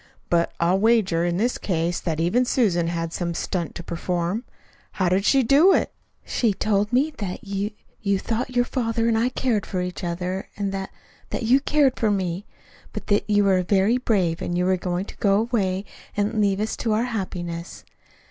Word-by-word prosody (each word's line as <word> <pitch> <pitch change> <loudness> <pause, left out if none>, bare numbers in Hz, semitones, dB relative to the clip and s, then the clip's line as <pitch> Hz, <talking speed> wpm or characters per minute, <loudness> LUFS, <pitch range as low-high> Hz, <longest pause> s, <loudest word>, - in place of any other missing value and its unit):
But 170 -1 +2
I'll 175 +3 +3
wager, 205 -6 +3
in 175 0 0
this 240 +5 0
case, 175 -2 -1
that 160 -3 -2
even 180 +10 +2
Susan 200 -10 +1
had 165 -1 -3
some 170 -2 -2
stunt 175 -1 -3
to 175 - -6
perform. 175 +5 -2 0.5
How 185 -3 +1
did 190 +2 +1
she 270 -1 +4
do 295 +11 +6
it?" - - +1 0.3
"She 220 -5 +1
told 205 0 +1
me 280 +5 +2
that 195 +2 -4
you 200 0 -2 0.3
you 200 -2 +1
thought 235 +5 -3
your 245 0 +3
father 230 -3 -1
and 230 - +2
I 230 +3 +2
cared 245 -5 0
for 185 - -3
each 180 +2 -4
other, 180 +2 -3
and 200 -1 -1
that 195 0 -4 0.4
that - - -3
you 250 +4 +5
cared 285 -2 +2
for 220 - +2
me; 190 -1 -2 0.5
but - - -6
that 205 - +1
you 205 -1 +4
were 190 -2 +3
very 200 +6 +2
brave 185 -9 +1
and 175 - -2
were 185 +1 +2
going 180 +1 -2
to - - -12
go 200 -2 +3
away, 200 -5 -1 0.3
and 210 +2 +1
leave 200 -1 +2
us 215 +1 -1
to 225 -2 0
our 220 +2 +2
happiness. 180 -7 -4
200 Hz, 195 wpm, -24 LUFS, 180-225 Hz, 0.5 s, do